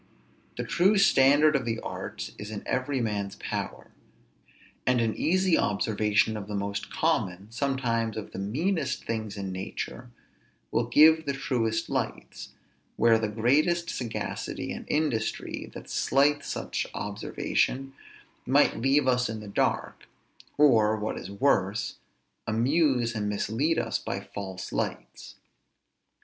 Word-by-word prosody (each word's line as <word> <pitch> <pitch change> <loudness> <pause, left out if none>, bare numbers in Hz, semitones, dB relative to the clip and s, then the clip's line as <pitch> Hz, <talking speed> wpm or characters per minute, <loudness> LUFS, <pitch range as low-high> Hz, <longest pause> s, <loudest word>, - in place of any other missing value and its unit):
The - - -2
true 195 +5 +3
standard 150 -4 +5
of 135 - +1
the 115 -1 -2
arts - - -6
is 105 - -6
in 105 -2 -6
every 130 +1 0
man's 105 -4 -2
power; - - -5 1.0
and 125 -1 +4
an 115 -2 0
easy 185 +1 +2
observation 105 +1 +1
of 105 -2 -6
the 105 - -4
most 100 0 -3
common, 95 +4 -1
sometimes 115 -3 -1
of 110 - -6
the - - -6
meanest 140 - -1
things 110 -3 -3
in 95 -1 -4
nature, 95 +5 -6 0.6
will - - +1
give 160 +1 +6
the 140 - +1
truest 115 -4 -1
lights, - - -4 0.5
where 115 -1 +4
the 110 - 0
greatest 145 +11 +2
sagacity 120 -3 -4
and - - -6
industry, 145 -8 -1
that - - -9
slights 145 +1 +2
such - - -3
observation, 130 +5 -1 0.5
must - - +3
leave 135 +3 +2
us 125 -2 +2
in 110 0 -4
the 105 - -9
dark, 100 - -1 0.5
or, 110 -7 +5
what 105 0 -3
is - - -7
worse, 100 -2 +1 0.5
amuse 125 +1 +2
and 105 -2 -2
mislead 120 +10 0
us - - -1
by - - -4
false 95 -2 -7
lights. - - -4
115 Hz, 135 wpm, -27 LUFS, 105-140 Hz, 1.0 s, give